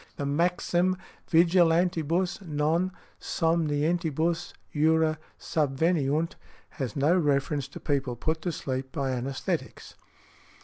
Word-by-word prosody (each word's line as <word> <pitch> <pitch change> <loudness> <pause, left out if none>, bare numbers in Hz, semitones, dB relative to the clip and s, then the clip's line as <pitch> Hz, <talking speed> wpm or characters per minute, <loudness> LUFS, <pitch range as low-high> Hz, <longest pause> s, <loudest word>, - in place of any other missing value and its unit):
The 140 - -3
maxim 175 +4 +1 0.3
vigilantibus, 170 +1 +3
non 165 +2 0 0.3
somnientibus 165 +1 0 0.2
jura 160 +1 +3 0.2
subveniunt, 155 +1 +1 0.4
has 130 -7 -5
no 145 +5 +3
reference 145 -4 +1
to 140 - -10
people 140 -5 -1
put 160 +6 -2
to 175 - -1
sleep 130 -3 -4
by 135 0 -1
anæsthetics. 130 +2 -3
160 Hz, 95 wpm, -27 LUFS, 140-170 Hz, 0.4 s, vigilantibus